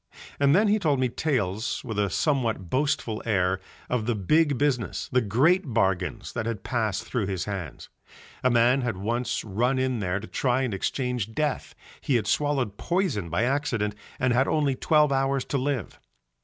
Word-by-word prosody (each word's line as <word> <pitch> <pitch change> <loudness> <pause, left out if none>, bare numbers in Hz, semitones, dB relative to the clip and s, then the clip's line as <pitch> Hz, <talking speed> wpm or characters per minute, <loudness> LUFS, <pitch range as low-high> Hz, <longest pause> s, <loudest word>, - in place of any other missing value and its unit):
And 140 +1 +4
then 210 +3 +4
he 210 +1 +3
told 150 -8 +1
me 130 -1 +2
tales 110 - -1
with 110 -2 -4
a 100 -1 +1
somewhat 115 - 0
boastful 130 -5 0
air 95 -4 +1 0.3
of 120 -3 -1
the 120 - +1
big 145 - +2
business, 130 -6 -1
the 125 - +3
great 135 - +2
bargains 95 0 0
that 115 -1 -2
had 115 -4 -4
passed 110 -5 -1
through 115 -6 -2
his 95 -3 -2
hands. 95 -5 -6 0.6
A 130 - +4
man 120 +2 +4
had 120 -6 -2
once 115 +5 -2
run 120 +6 0
in 130 -2 0
there 95 -1 -1
to 105 - -8
try 130 +2 0
and 125 -5 -2
exchange 120 +2 -2
death, 150 -2 -2 0.3
he 135 - 0
had 115 - +1
swallowed 135 -8 0
poison 170 - -1
by 85 +7 0
accident 120 -6 0 0.3
and 130 -1 +2
had 130 +3 +3
only 145 -3 +2
twelve 150 +2 +3
hours 135 0 +1
to 140 - -1
live. 130 -5 -3
125 Hz, 180 wpm, -26 LUFS, 105-140 Hz, 0.6 s, And